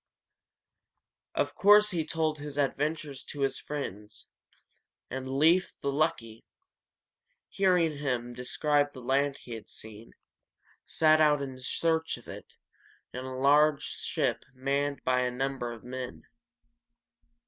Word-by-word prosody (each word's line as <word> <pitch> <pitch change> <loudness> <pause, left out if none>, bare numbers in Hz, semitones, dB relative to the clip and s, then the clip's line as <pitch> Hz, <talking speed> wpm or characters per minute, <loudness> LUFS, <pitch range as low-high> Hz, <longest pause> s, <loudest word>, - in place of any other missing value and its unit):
Of - - 0
course 210 +1 +6
he 170 -3 0
told 155 -1 -1
his 145 -1 -7
adventures 145 0 -1
to 145 - -7
his 135 -1 0
friends, 105 -8 -6 0.8
and 130 +1 -4
Leīf 160 +7 +3
the 140 - 0
Lucky, 115 -6 -1 1.1
hearing 180 -6 +2
him 125 -4 -2
describe 145 +4 0
the 130 - -9
land 135 +2 +1
he 120 - -13
had 115 -2 -7
seen, 110 +1 -11 0.7
set 155 -1 +4
out 150 -1 +5
in 135 -2 -6
search 160 +5 0
of - - -16
it, - - -10 0.6
in 125 +1 -5
a 130 0 -5
large 145 +2 +4
ship - - -2
manned 140 +2 -1
by 125 0 +2
a 125 0 +1
number 130 -1 -2
of 115 -2 -10
men. 125 -10 -6
140 Hz, 125 wpm, -29 LUFS, 125-155 Hz, 1.1 s, course